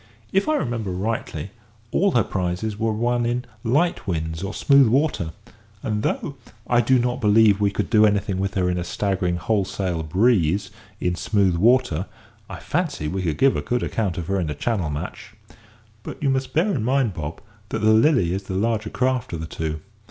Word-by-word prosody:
If 195 Hz, +8 st, +2 dB
I 310 Hz, -, +3 dB
remember 120 Hz, -, -2 dB
rightly, 95 Hz, -3 st, -3 dB, 0.4 s
all 200 Hz, 0 st, +2 dB
her 120 Hz, -, +4 dB
prizes 95 Hz, +4 st, -3 dB
were 115 Hz, 0 st, +1 dB
won 120 Hz, +2 st, 0 dB
in 120 Hz, +1 st, -1 dB, 0.2 s
light 150 Hz, +8 st, +1 dB
winds 80 Hz, -2 st, -2 dB
or 100 Hz, +1 st, -3 dB
smooth 140 Hz, +3 st, +5 dB
water; 125 Hz, -, +1 dB, 0.5 s
and 105 Hz, -1 st, -1 dB
though 140 Hz, +4 st, -2 dB, 0.3 s
I 120 Hz, 0 st, +3 dB
do 130 Hz, +3 st, +3 dB
not 125 Hz, +1 st, -1 dB
believe 105 Hz, -1 st, +5 dB
we 100 Hz, -, +3 dB
could 100 Hz, -, -3 dB
do 110 Hz, -2 st, +6 dB
anything 100 Hz, -2 st, 0 dB
with 95 Hz, 0 st, -2 dB
her 90 Hz, -2 st, +1 dB
in 90 Hz, 0 st, 0 dB
a -, -, -2 dB
staggering 90 Hz, -1 st, -1 dB
whole 100 Hz, +3 st, +1 dB
sail 90 Hz, -3 st, -3 dB
breeze 95 Hz, +2 st, +2 dB, 0.3 s
in 90 Hz, -, 0 dB
smooth 100 Hz, -2 st, +1 dB
water, 105 Hz, -3 st, +2 dB, 0.4 s
I -, -, -6 dB
fancy 155 Hz, -, -2 dB
we 95 Hz, +4 st, -2 dB
could 80 Hz, -5 st, -1 dB
give 135 Hz, 0 st, +4 dB
a -, -, -1 dB
good 125 Hz, -1 st, -1 dB
account 100 Hz, -5 st, -2 dB
of 85 Hz, -, -3 dB
her 95 Hz, +3 st, 0 dB
in 85 Hz, -4 st, -2 dB
a 75 Hz, -, -3 dB
Channel 95 Hz, -2 st, -1 dB
match. 75 Hz, 0 st, -6 dB, 0.7 s
But -, -, -8 dB
you 135 Hz, -, +3 dB
must 130 Hz, -1 st, -2 dB
bear 185 Hz, +6 st, +2 dB
in 120 Hz, -, -1 dB
mind, 130 Hz, -3 st, +1 dB
Bob, 75 Hz, -1 st, -5 dB, 0.3 s
that 110 Hz, -, -3 dB
the 110 Hz, 0 st, +5 dB
Lily 110 Hz, -, +4 dB
is 95 Hz, -, -2 dB
the 95 Hz, -, -4 dB
larger 110 Hz, +1 st, 0 dB
craft 130 Hz, -5 st, -1 dB
of 85 Hz, -, -3 dB
the -, -, -4 dB
two." 80 Hz, -1 st, -4 dB
105 Hz, 200 wpm, -23 LUFS, 90-120 Hz, 0.7 s, do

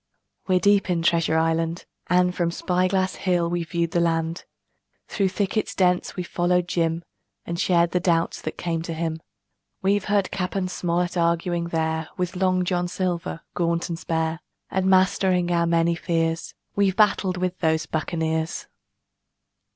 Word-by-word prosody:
We're 185 Hz, -1 st, +3 dB
deep 200 Hz, 0 st, +3 dB
in 170 Hz, -2 st, +1 dB
Treasure 165 Hz, -1 st, +2 dB
Island, 165 Hz, +1 st, 0 dB, 0.2 s
and 180 Hz, 0 st, +3 dB
From 175 Hz, -2 st, 0 dB
Spy 180 Hz, +2 st, 0 dB
Glass 190 Hz, 0 st, 0 dB
Hill 175 Hz, -2 st, +1 dB
we've 170 Hz, -2 st, -2 dB
viewed 170 Hz, -1 st, -1 dB
the 170 Hz, -, +1 dB
land; 165 Hz, 0 st, 0 dB, 0.6 s
Through 195 Hz, -3 st, 0 dB
thickets 205 Hz, +2 st, -1 dB
dense 180 Hz, -1 st, +1 dB
we've 180 Hz, -, -3 dB
followed 175 Hz, 0 st, +1 dB
Jim 165 Hz, -1 st, 0 dB, 0.4 s
And 170 Hz, 0 st, -4 dB
shared 170 Hz, -2 st, +3 dB
the 180 Hz, -, +2 dB
doubts 170 Hz, -2 st, +1 dB
that -, -, -5 dB
came 165 Hz, -2 st, -2 dB
to 165 Hz, 0 st, -5 dB
him. 160 Hz, 0 st, -3 dB, 0.6 s
We've 200 Hz, +1 st, +2 dB
heard 200 Hz, -2 st, +1 dB
Cap. 180 Hz, 0 st, -3 dB, 0.2 s
Smollett 175 Hz, 0 st, -1 dB
arguing 170 Hz, 0 st, +1 dB
there 160 Hz, -1 st, -1 dB
With 180 Hz, 0 st, -2 dB
Long 185 Hz, 0 st, +1 dB
John 180 Hz, -1 st, 0 dB
Silver, 175 Hz, -2 st, -3 dB
gaunt 170 Hz, 0 st, 0 dB
and 165 Hz, -1 st, -4 dB
spare, 160 Hz, -1 st, -1 dB, 0.3 s
And 190 Hz, 0 st, 0 dB
mastering 185 Hz, -1 st, +3 dB
our 170 Hz, -1 st, +2 dB
many 170 Hz, 0 st, +3 dB
fears 165 Hz, -1 st, -1 dB, 0.2 s
We've 200 Hz, -2 st, +2 dB
battled 195 Hz, -3 st, +3 dB
with 185 Hz, 0 st, -2 dB
those 160 Hz, -1 st, +1 dB
buccaneers. 160 Hz, 0 st, -2 dB
175 Hz, 155 wpm, -24 LUFS, 165-185 Hz, 0.6 s, We're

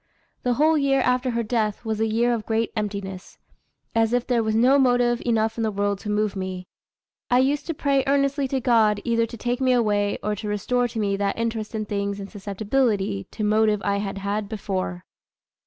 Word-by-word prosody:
The 245 Hz, -1 st, +1 dB
whole 310 Hz, +3 st, +3 dB
year 275 Hz, -1 st, +2 dB
after 250 Hz, +1 st, +1 dB
her 235 Hz, -1 st, -1 dB
death 215 Hz, -1 st, -1 dB
was 220 Hz, -1 st, -2 dB
a 225 Hz, -, +2 dB
year 235 Hz, +2 st, +2 dB
of 225 Hz, -2 st, -4 dB
great 225 Hz, 0 st, 0 dB
emptiness, 200 Hz, -3 st, -5 dB, 0.6 s
as 225 Hz, 0 st, +2 dB
if 245 Hz, -1 st, +1 dB
there 245 Hz, -2 st, +1 dB
was 220 Hz, -1 st, 0 dB
not 260 Hz, +5 st, +5 dB
motive 245 Hz, -2 st, +2 dB
enough 225 Hz, -1 st, +1 dB
in 230 Hz, -, -1 dB
the 220 Hz, -, +1 dB
world 205 Hz, -1 st, -1 dB
to 210 Hz, -, -6 dB
move 210 Hz, 0 st, 0 dB
me. 185 Hz, -1 st, -4 dB, 0.6 s
I 245 Hz, -, +4 dB
used 275 Hz, +3 st, +1 dB
to 330 Hz, -, -2 dB
pray 275 Hz, -2 st, +1 dB
earnestly 275 Hz, 0 st, +1 dB
to 265 Hz, 0 st, -1 dB
God 225 Hz, -4 st, +3 dB
either 230 Hz, -1 st, +1 dB
to 235 Hz, -, -9 dB
take 245 Hz, +3 st, -2 dB
me 255 Hz, -1 st, +3 dB
away, 205 Hz, -4 st, +1 dB
or 210 Hz, 0 st, -1 dB
to 210 Hz, -, -5 dB
restore 245 Hz, +4 st, 0 dB
to 230 Hz, -, -8 dB
me 200 Hz, -2 st, 0 dB
that 200 Hz, 0 st, -1 dB
interest 225 Hz, -1 st, -3 dB
in 215 Hz, -1 st, -2 dB
things 200 Hz, -1 st, -2 dB
and 200 Hz, 0 st, -8 dB
susceptibility 205 Hz, -, -1 dB
to 215 Hz, -, -5 dB
motive 215 Hz, 0 st, +3 dB
I 200 Hz, 0 st, +1 dB
had 200 Hz, -1 st, -3 dB
had 200 Hz, +1 st, -3 dB
before." 185 Hz, -4 st, -4 dB
220 Hz, 205 wpm, -24 LUFS, 205-245 Hz, 0.6 s, not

